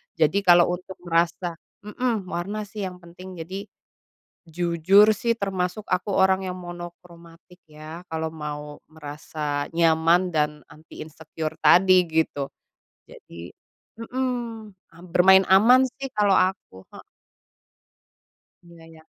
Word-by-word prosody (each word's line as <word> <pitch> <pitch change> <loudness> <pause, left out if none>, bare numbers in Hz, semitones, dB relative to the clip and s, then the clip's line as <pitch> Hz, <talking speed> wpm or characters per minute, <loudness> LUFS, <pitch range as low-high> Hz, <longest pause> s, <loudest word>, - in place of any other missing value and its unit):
Jadi, 165 +5 +2
kalau 175 -1 +6
untuk 185 +1 -12
merasa 170 0 -1 0.3
mmm, 225 -2 -2
warna 200 +4 -4
sih 205 +1 -8
yang 185 -1 -6
penting. 180 +1 -12
Jadi, 190 +5 -7 0.8
jujur 175 +5 +3
sih, 235 +1 0
termasuk 190 0 -3
aku 185 +2 -1
orang 190 0 +3
yang 180 - -4
monokromatik 175 0 -12
ya, 155 +2 -10
kalau 160 0 -2
mau 150 -1 -7
merasa 150 -1 -5
nyaman 165 +2 +3
dan 150 0 0
anti 155 +1 -15
insecure 160 0 -7
tadi, 185 +3 +6
gitu. 160 -3 -1 0.6
Jadi 85 +1 -12 0.5
mhm, 235 -3 -4 0.2
am 170 +2 -15
bermain 190 +1 +6
aman 225 +7 +6
sih 270 +2 -8
kalau 205 -2 +2
aku 185 - -1
ha - - -11 1.6
Iya 170 -1 -16
iya. 160 -1 -16
175 Hz, 120 wpm, -24 LUFS, 160-190 Hz, 1.6 s, kalau